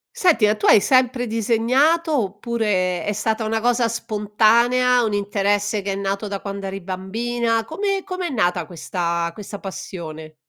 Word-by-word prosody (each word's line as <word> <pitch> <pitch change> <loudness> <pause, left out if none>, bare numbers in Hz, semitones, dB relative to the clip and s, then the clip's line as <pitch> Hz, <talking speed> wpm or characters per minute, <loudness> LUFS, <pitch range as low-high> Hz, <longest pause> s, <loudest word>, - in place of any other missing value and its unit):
Senti, 355 - +4
a 210 - +3
tu 210 - -2
hai - - +8
sempre 255 -1 +2
disegnato 255 +8 +2
oppure 200 -4 -1
è 205 - -1
stata 220 +2 -1
una 225 +1 0
cosa 240 0 +2
spontanea, 230 +3 +2
un 215 -2 -1
interesse 205 +1 0
che 195 0 -3
è - - -2
nato 195 +1 -3
da 200 -1 -4
quando 200 -1 -5
eri 195 0 -5
bambina, 225 +5 -2
come 390 - -2
come 365 -2 -4
è - - -4
nata 180 - 0
questa 170 0 -2
questa 205 +2 -8
passione? 160 -5 -8
215 Hz, 160 wpm, -21 LUFS, 195-240 Hz, -, hai